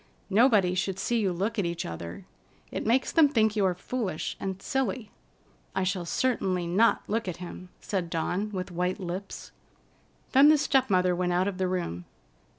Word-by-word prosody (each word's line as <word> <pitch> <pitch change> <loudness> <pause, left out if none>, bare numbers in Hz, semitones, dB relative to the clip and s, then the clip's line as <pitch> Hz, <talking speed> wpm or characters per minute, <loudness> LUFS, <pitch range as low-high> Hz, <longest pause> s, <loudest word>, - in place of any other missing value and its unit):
Nobody 210 -4 +4
should 190 0 -1
see 235 +4 0
you 195 -4 +1
look 205 +6 -2
at 195 - +1
each 170 0 -3
other. 85 +1 -7 0.5
It - - -3
makes 245 +3 +2
them 320 -3 +6
think 220 -5 +2
you 210 - +2
are 185 -1 +1
foolish 195 -3 -3
and 190 -1 -4
silly." 260 0 -2 0.6
"I 190 - +1
shall 185 -2 -1
certainly 185 -4 0
not 195 +7 +3
look 225 0 -1
at 180 - -4
him," 180 +1 -9
said 185 -4 -2
Dawn 175 +5 -1
with 185 -2 -4
white 180 +1 -1
lips. 185 +1 -6 0.8
Then 280 +2 +7
the 310 - +6
step 270 -3 +2
mother 180 -2 +3
went 180 0 0
out 180 +2 +2
of 195 -2 -4
the 185 - +1
room. 170 - -3
190 Hz, 180 wpm, -28 LUFS, 180-225 Hz, 0.8 s, Then